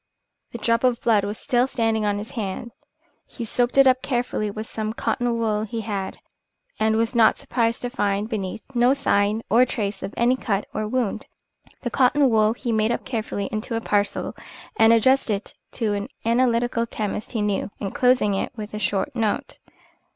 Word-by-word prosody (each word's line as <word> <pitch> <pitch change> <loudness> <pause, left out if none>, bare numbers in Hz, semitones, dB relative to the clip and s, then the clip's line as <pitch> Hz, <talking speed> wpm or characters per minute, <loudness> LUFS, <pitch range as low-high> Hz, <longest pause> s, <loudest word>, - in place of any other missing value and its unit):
The - - -6
drop 230 +1 +1
of 250 -2 +2
blood 215 -4 +3
was 205 +1 -3
still 245 +1 +1
standing 225 -4 0
on 205 0 0
his 210 +2 -6
hand. 225 -1 -4 0.6
He 235 - -6
soaked 245 +3 0
it 275 - +8
up 260 -1 +4
carefully 240 -4 -1
with 215 +2 -5
some 220 0 -4
cotton 235 +1 -1
wool 215 -2 0
he 220 +1 -4
had, 200 -3 -4 0.6
and 220 0 +2
was 230 +2 +1
not 230 -2 +5
surprised 235 -1 -1
to 245 - -1
find 205 -4 0
beneath 215 -2 -4
no 245 +2 +4
sign 215 -5 +1
or 235 +3 +5
trace 210 -5 -2
of 195 - -6
any 240 +2 +3
cut 210 -6 -1
or 215 0 -2
wound. 245 -2 -2 0.6
The 240 - -2
cotton 265 +1 +3
wool 215 0 +4
he 240 0 -4
made 220 0 +2
up - - -2
carefully 220 -4 -3
into 220 +2 -3
a - - 0
parcel 205 -2 0 0.4
and 225 0 +6
addressed 260 +3 +4
it 205 -1 -2 0.2
to 215 -3 0
an 205 0 -3 0.2
analytical 235 0 +2
chemist 215 +1 -4
he 220 -3 0
knew, 205 0 -1
inclosing 235 +2 +2 0.2
with 210 -2 -7
it - - -3
a - - -4
short 205 +7 -1
note. 220 -3 -2
225 Hz, 185 wpm, -23 LUFS, 210-240 Hz, 0.6 s, it